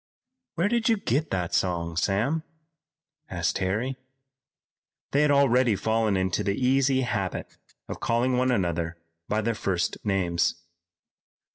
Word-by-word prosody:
"Where 170 Hz, +4 st, +2 dB
did 235 Hz, +1 st, +1 dB
you 225 Hz, -, +4 dB
get 150 Hz, -, -1 dB
that 90 Hz, -3 st, -2 dB
song, 85 Hz, -2 st, 0 dB
Sam?" 105 Hz, -, +1 dB, 0.9 s
asked 85 Hz, 0 st, -1 dB
Harry 110 Hz, +8 st, -1 dB, 1.1 s
they 140 Hz, -, +3 dB
had 150 Hz, -, +3 dB
already 130 Hz, -5 st, +4 dB
fallen 110 Hz, 0 st, +1 dB
into 95 Hz, -1 st, 0 dB
the 100 Hz, -, 0 dB
easy 130 Hz, +1 st, +3 dB
habit 100 Hz, -7 st, -3 dB, 0.3 s
of -, -, -6 dB
calling 120 Hz, +2 st, +1 dB
one 130 Hz, +1 st, +2 dB
another 85 Hz, -7 st, -1 dB, 0.3 s
by 110 Hz, +1 st, 0 dB
their 115 Hz, +2 st, 0 dB
first 90 Hz, -5 st, -2 dB
names. 90 Hz, -4 st, +1 dB
110 Hz, 130 wpm, -26 LUFS, 95-130 Hz, 1.1 s, you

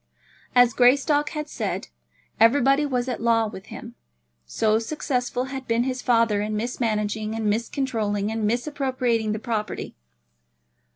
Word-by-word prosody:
As 245 Hz, -1 st, +6 dB
Greystock 285 Hz, +5 st, +3 dB
had 300 Hz, -1 st, -5 dB
said, -, -, -4 dB, 0.5 s
everybody 275 Hz, +5 st, +4 dB
was 250 Hz, -2 st, -1 dB
at 250 Hz, -3 st, -3 dB
law 230 Hz, -1 st, +3 dB
with 200 Hz, -3 st, -8 dB
him, -, -, -9 dB, 0.5 s
so 220 Hz, -, +1 dB
successful 250 Hz, -1 st, -2 dB
had 265 Hz, 0 st, -6 dB
been 230 Hz, +1 st, +2 dB
his 255 Hz, 0 st, -3 dB
father 230 Hz, -4 st, +2 dB
in 210 Hz, 0 st, -2 dB
mismanaging, 215 Hz, -2 st, -2 dB
and 225 Hz, -1 st, -3 dB
miscontrolling, 220 Hz, -2 st, -1 dB
and 220 Hz, -1 st, -2 dB
misappropriating 245 Hz, -3 st, -1 dB
the 215 Hz, -, -1 dB
property. 220 Hz, -2 st, -4 dB
235 Hz, 130 wpm, -24 LUFS, 220-260 Hz, 0.5 s, As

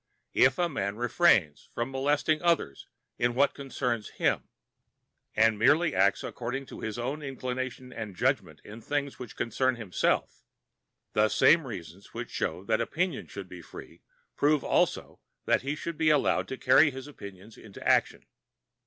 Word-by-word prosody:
If 130 Hz, 0 st, +4 dB
a 175 Hz, -, +2 dB
man 100 Hz, -, -3 dB
refrains 115 Hz, -, +2 dB
from 120 Hz, +3 st, -2 dB
molesting 145 Hz, +3 st, +1 dB
others 170 Hz, -, 0 dB, 0.3 s
in 120 Hz, 0 st, +1 dB
what 140 Hz, +2 st, +3 dB
concerns 125 Hz, -5 st, -3 dB
him, -, -, -1 dB, 0.9 s
and 110 Hz, -1 st, +3 dB
merely 150 Hz, +7 st, +4 dB
acts 95 Hz, +1 st, +2 dB
according 125 Hz, +3 st, -4 dB
to -, -, -8 dB
his 110 Hz, 0 st, -4 dB
own 135 Hz, +6 st, -3 dB
inclination 130 Hz, -2 st, -5 dB
and 105 Hz, -4 st, -6 dB
judgment 105 Hz, -, -1 dB
in 110 Hz, +2 st, -11 dB
things 140 Hz, +2 st, -3 dB
which 120 Hz, -5 st, -8 dB
concern 130 Hz, +3 st, 0 dB
himself, 110 Hz, -6 st, -1 dB, 0.7 s
the 110 Hz, 0 st, +3 dB
same 160 Hz, +4 st, +4 dB
reasons 95 Hz, -3 st, -9 dB
which -, -, -5 dB
show 90 Hz, -, -3 dB
that 110 Hz, +2 st, +1 dB
opinion 175 Hz, -3 st, -2 dB
should 100 Hz, -2 st, -8 dB
be 90 Hz, -1 st, -10 dB
free -, -, -12 dB, 0.3 s
prove 145 Hz, -1 st, +2 dB
also -, -, 0 dB, 0.3 s
that -, -, +2 dB
he 140 Hz, +3 st, -2 dB
should 165 Hz, +1 st, -6 dB
be 155 Hz, -, +4 dB
allowed 150 Hz, -2 st, +2 dB
to 130 Hz, -, -5 dB
carry 130 Hz, +4 st, +5 dB
his 135 Hz, -1 st, -8 dB
opinions 100 Hz, -6 st, -11 dB
into 105 Hz, -3 st, -9 dB
action. -, -, +2 dB
125 Hz, 155 wpm, -28 LUFS, 105-140 Hz, 0.9 s, carry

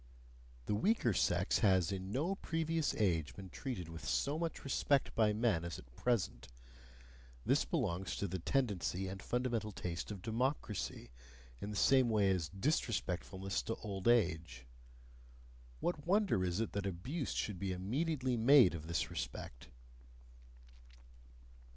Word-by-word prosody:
The -, -, 0 dB
weaker 120 Hz, -, +2 dB
sex -, -, +2 dB
has 95 Hz, -3 st, +3 dB
in 95 Hz, 0 st, -4 dB
no 155 Hz, -, 0 dB
previous 165 Hz, -4 st, -1 dB
age 80 Hz, -, +1 dB
been 95 Hz, -2 st, -9 dB
treated 120 Hz, -, -5 dB
with 80 Hz, -2 st, -9 dB
so 65 Hz, -, 0 dB
much 165 Hz, -2 st, -3 dB
respect 140 Hz, 0 st, +1 dB
by 110 Hz, -2 st, +3 dB
men 105 Hz, -6 st, +1 dB
as 85 Hz, 0 st, -4 dB
at -, -, -14 dB
present 110 Hz, -, 0 dB, 1.0 s
this -, -, +3 dB
belongs 90 Hz, +3 st, -1 dB
to 100 Hz, -, -2 dB
the 95 Hz, +1 st, -3 dB
tendency 95 Hz, -4 st, 0 dB
and 95 Hz, +1 st, -6 dB
fundamental 120 Hz, -3 st, -1 dB
taste 90 Hz, -3 st, -4 dB
of 100 Hz, -4 st, -7 dB
democracy, 115 Hz, -, -2 dB, 0.5 s
in 100 Hz, -, -5 dB
the 105 Hz, -, -5 dB
same 130 Hz, +4 st, +5 dB
way 105 Hz, -3 st, +3 dB
as 85 Hz, -5 st, 0 dB
disrespectfulness 95 Hz, -, -1 dB
to 115 Hz, -, -2 dB
old 100 Hz, -2 st, -5 dB
age 80 Hz, -, +2 dB, 1.2 s
what 155 Hz, -3 st, -2 dB
wonder 195 Hz, -, +3 dB
is 90 Hz, +1 st, -1 dB
it 115 Hz, -, -1 dB
that 100 Hz, -1 st, -2 dB
abuse 125 Hz, -, -3 dB
should 100 Hz, -5 st, -2 dB
be 95 Hz, 0 st, -2 dB
immediately 130 Hz, -, -1 dB
made 120 Hz, -3 st, +7 dB
of 80 Hz, -2 st, -6 dB
this 85 Hz, -, -1 dB
respect? -, -, -6 dB
100 Hz, 140 wpm, -36 LUFS, 90-130 Hz, 1.2 s, made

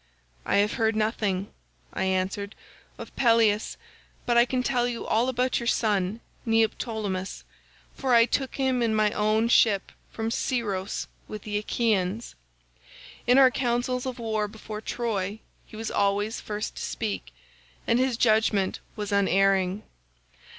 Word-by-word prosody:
"'I -, -, +2 dB
have 205 Hz, +1 st, +3 dB
heard 225 Hz, -2 st, +1 dB
nothing,' 215 Hz, -3 st, 0 dB, 0.5 s
I -, -, -1 dB
answered, 190 Hz, +2 st, -1 dB, 0.4 s
'of -, -, -10 dB
Peleus, 225 Hz, -3 st, +3 dB, 0.5 s
but 240 Hz, -, +1 dB
I 235 Hz, 0 st, +6 dB
can 255 Hz, 0 st, -1 dB
tell 245 Hz, -2 st, +1 dB
you 240 Hz, -1 st, -4 dB
all 235 Hz, +4 st, +2 dB
about 255 Hz, 0 st, 0 dB
your 235 Hz, -, -4 dB
son 210 Hz, -2 st, +1 dB, 0.2 s
Neoptolemus, 220 Hz, -4 st, -1 dB, 0.5 s
for 260 Hz, -3 st, +2 dB
I 230 Hz, 0 st, +7 dB
took 265 Hz, +2 st, -2 dB
him 260 Hz, -2 st, +1 dB
in 225 Hz, -2 st, +1 dB
my 215 Hz, -1 st, +3 dB
own 215 Hz, +2 st, +2 dB
ship 215 Hz, -4 st, +3 dB, 0.2 s
from 225 Hz, 0 st, -3 dB
Scyros 205 Hz, -7 st, -2 dB, 0.2 s
with 215 Hz, -1 st, -7 dB
the 205 Hz, -1 st, -2 dB
Achaeans. 210 Hz, -1 st, -1 dB, 0.9 s
In 250 Hz, +2 st, +5 dB
our 265 Hz, -2 st, +7 dB
councils 250 Hz, +1 st, -1 dB
of 255 Hz, -1 st, -4 dB
war 220 Hz, -3 st, -1 dB
before 215 Hz, 0 st, -8 dB
Troy 215 Hz, -4 st, -2 dB, 0.3 s
he -, -, -13 dB
was 220 Hz, 0 st, -4 dB
always 205 Hz, +2 st, 0 dB
first 210 Hz, 0 st, -5 dB
to -, -, -5 dB
speak, 210 Hz, -, -4 dB, 0.5 s
and 235 Hz, -, +2 dB
his 255 Hz, -2 st, +1 dB
judgement 215 Hz, -4 st, +2 dB, 0.2 s
was 210 Hz, -1 st, -4 dB
unerring. 195 Hz, 0 st, +2 dB
220 Hz, 145 wpm, -26 LUFS, 205-240 Hz, 0.9 s, I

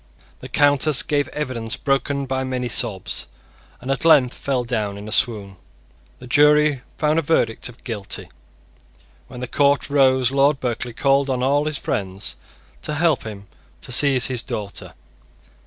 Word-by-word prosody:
The 130 Hz, -, -10 dB
Countess 145 Hz, +1 st, +3 dB
gave 145 Hz, -2 st, 0 dB
evidence 130 Hz, -5 st, -4 dB
broken 140 Hz, 0 st, -1 dB
by 130 Hz, 0 st, -2 dB
many 130 Hz, -1 st, -3 dB
sobs, 110 Hz, -5 st, -1 dB, 0.5 s
and 130 Hz, +2 st, -4 dB
at 135 Hz, -, -2 dB
length 145 Hz, -6 st, +5 dB
fell 130 Hz, -3 st, -2 dB
down 110 Hz, -5 st, -3 dB
in 100 Hz, +1 st, -9 dB
a -, -, -7 dB
swoon. 100 Hz, -6 st, +1 dB, 0.6 s
The 125 Hz, -, -12 dB
jury 150 Hz, +1 st, +4 dB, 0.2 s
found 155 Hz, +1 st, +2 dB
a -, -, +1 dB
verdict 140 Hz, -7 st, 0 dB
of 125 Hz, -, -16 dB
Guilty. 105 Hz, -5 st, -5 dB, 1.0 s
When 125 Hz, -1 st, -10 dB
the 125 Hz, -, -4 dB
court 140 Hz, +2 st, +1 dB
rose 130 Hz, -3 st, +3 dB
Lord 140 Hz, +1 st, +3 dB
Berkeley 120 Hz, -1 st, -3 dB
called 140 Hz, +2 st, +2 dB
on 125 Hz, -1 st, -1 dB
all 145 Hz, +3 st, +2 dB
his 155 Hz, -1 st, -2 dB
friends 100 Hz, -5 st, -4 dB, 0.5 s
to 150 Hz, -, -3 dB
help 160 Hz, -4 st, +1 dB
him 105 Hz, -2 st, -8 dB, 0.4 s
to -, -, -7 dB
seize 130 Hz, 0 st, +4 dB
his 125 Hz, -3 st, -1 dB
daughter. 110 Hz, -5 st, -6 dB
130 Hz, 155 wpm, -21 LUFS, 120-145 Hz, 1.0 s, length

